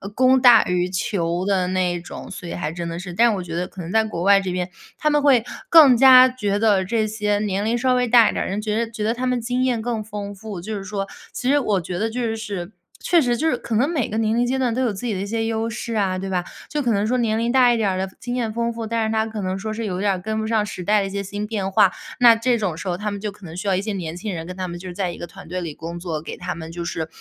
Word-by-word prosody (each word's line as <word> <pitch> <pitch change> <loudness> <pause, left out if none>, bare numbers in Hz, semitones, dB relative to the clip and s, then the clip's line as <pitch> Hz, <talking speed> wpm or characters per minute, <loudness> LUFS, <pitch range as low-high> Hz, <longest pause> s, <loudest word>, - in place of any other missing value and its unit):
供 260 0 +5
大 245 -3 +7
于 180 0 0
求 180 -2 -1
的 190 -2 +1
那 180 -1 0
种， 175 - -9
所 180 -2 -8
以 - - -5
还 155 -3 -3
真 170 +1 -5
的 165 0 -4
是。 180 -1 -7
但 230 +4 +4
我 185 - -4
觉 165 -1 -6
得 180 +1 -2
可 190 - -10
能 170 +1 -6
在 220 +2 +3
国 175 -6 -4
外 200 +1 +6
这 190 -2 -3
边， 180 0 -2 0.3
他 305 - +1
们 295 -1 +2
会 270 -5 +4 0.3
更 290 -7 +8
加 255 0 +8
觉 205 -5 -2
得 205 -4 +3
这 220 +3 0
些 210 -1 -1
年 205 -1 -1
龄 230 +2 +1
稍 255 +1 +2
微 250 0 +1
大 235 -1 +6
一 - - -3
点 - - -1
儿 - - -5
的 - - -4
人 200 +2 -2
觉 215 0 -1
得 230 0 -1
觉 220 -2 -5
得 220 +2 +1
他 250 +2 -3
们 250 -1 0
经 245 +2 -1
验 245 -3 0
更 230 -1 -2
丰 205 -1 -6
富， 200 -2 -8
就 215 +5 -5
是 195 - -6
说， 195 0 -4 0.3
其 250 - -2
实 290 +1 +4
我 205 -8 0
觉 175 +1 -5
得 220 +2 0
就 230 -1 -2
是 200 -4 -5 0.3
确 345 -2 +3
实 245 -3 +1
就 320 - 0
是 - - +1
可 230 - -4
能 245 +6 +3
每 300 -9 0
个 215 - -3
年 220 0 +1
龄 240 +1 +2
阶 260 +2 0
段 250 -3 0
都 255 - -1
有 245 -3 +1
自 200 +5 -7
己 230 - -1
的 190 - -3
一 - - -3
些 225 +1 -1
优 225 0 -1
势 230 +1 -5
啊， 195 -4 0
对 195 +1 -4
吧？ 180 -2 -1 0.3
就 300 - -1
可 245 -4 +1
能 205 -1 +1 0.2
年 220 -2 +1
龄 230 +1 0
大 255 -1 +5
一 - - 0
点 220 -2 +1
儿 185 - -2
的 190 0 -2
经 245 +1 -5
验 235 -3 -1
丰 235 +1 -1
富， 230 -1 -5
但 230 0 0
是 220 - -1
他 220 0 +1
可 220 -1 -5
能 185 0 -2
说 215 +2 -4
是 225 +1 -4
有 185 -3 -3
点 200 0 +2
儿 185 - -4
跟 220 +4 -3
不 220 - -3
上 220 -2 +1
时 185 -3 -6
代 210 +3 +3
的 - - -1
一 - - -6
些 200 0 -2
新 205 +1 -5
变 210 -3 -2
化， 190 0 +5 0.3
那 240 -2 +8
这 240 +1 +1
种 195 -7 -2
时 180 - -7
候 175 -1 -1
他 210 +2 -3
们 200 - -5
就 210 -1 -3
可 200 -1 -15
能 160 -1 -9
需 190 +3 -5
要 195 - +3
一 185 - 0
些 210 +1 -3
年 170 -4 -4
轻 200 +2 -4
人 165 -1 -6
跟 180 - -7
他 185 -1 -3
们 175 0 -7
就 185 - -9
是 175 - -9
在 185 -2 -1
一 - - -9
个 175 - -6
团 - - -13
队 180 +2 -4
里 165 -3 -5
工 170 +1 -7
作， 170 -3 -3
给 165 - -7
他 - - -4
们 160 0 -8
就 170 0 -5
是， 160 -2 -3
210 Hz, 350 characters per minute, -22 LUFS, 185-230 Hz, 0.3 s, 更